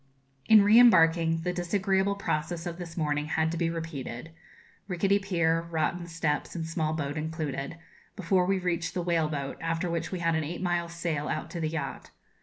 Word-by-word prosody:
In 215 -2 +8
re 210 +3 +7
embarking, 165 -7 +5
the 180 +2 -2
disagreeable 190 +2 +1
process 165 -3 -2
of 175 0 -5
this 170 -1 -8
morning 150 -2 0
had 160 +1 +1
to 170 - -3
be 165 0 +1
repeated 165 -4 -6 0.6
rickety 195 +2 +2
pier, 170 -4 +1
rotten 170 +2 -1
steps, 165 -3 -2
and 165 -2 -3
small 160 -1 -1
boat 145 -1 -3
included 155 -2 -4 0.4
before 185 -1 +1
we 195 0 +2
reached 175 -2 -2
the 180 - -1
whale 165 -3 +1
boat, 140 -3 -4
after 165 +1 -1
which 170 0 -2
we 185 - -2
had 165 -1 +1
an 160 0 0
eight 165 +4 -5
miles' 175 -1 -1
sail 160 -4 -2
out 155 +1 -3
to 170 - -5
the 160 -1 -1
yacht. 150 -4 -5
165 Hz, 190 wpm, -28 LUFS, 160-180 Hz, 0.6 s, In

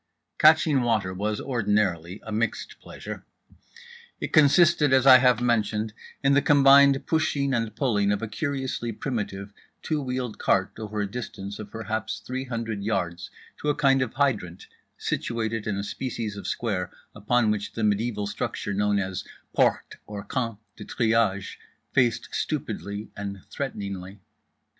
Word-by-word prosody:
"Catching 155 -3 +5
water" 110 -6 0
was 105 +3 -2
ordinarily 105 - 0
a 110 - -6
mixed 115 +2 -2
pleasure. - - -8 1.0
It - - -5
consisted, 155 0 +5
as 130 -1 +4
I 130 -1 +10
have 125 -1 +4
mentioned, 110 -2 0 0.3
in 135 0 +4
the 140 - +5
combined 140 -1 +6
pushing 145 -4 +1
and 115 -3 -1
pulling 105 -7 +1
of 105 +1 -1
a - - -2
curiously 130 0 -3
primitive 105 -5 -4 0.3
two 155 -2 -1
wheeled 125 -3 -4
cart 95 0 +2
over 105 -1 -3
a 100 - -1
distance 100 -2 -6
of 105 -1 -7
perhaps 110 -1 -3
three 130 +5 -5
hundred 115 -4 -4
yards 90 -5 -2 0.3
to 150 - -1
a 145 - +2
kind 135 -2 +3
of 130 -3 -2
hydrant 110 -11 0 0.3
situated 115 -2 -2
in 100 -2 -1
a 100 - -2
species 110 -1 -4
of 100 - -7
square 95 -6 -2 0.2
upon 110 +2 +1
which 105 -1 -3
the 115 - -3
mediaeval 105 0 0
structure 100 0 -3
known 105 +1 +1
as 95 -2 -2 0.3
Porte - - +1
(or 105 -1 -6
Camp) 115 -5 -3 0.2
de - - -8
Triage 110 -4 0 0.3
faced 120 -4 +2
stupidly 100 +2 -4
and 100 -1 -6
threateningly. 100 -7 -5
110 Hz, 150 wpm, -26 LUFS, 100-130 Hz, 1.0 s, I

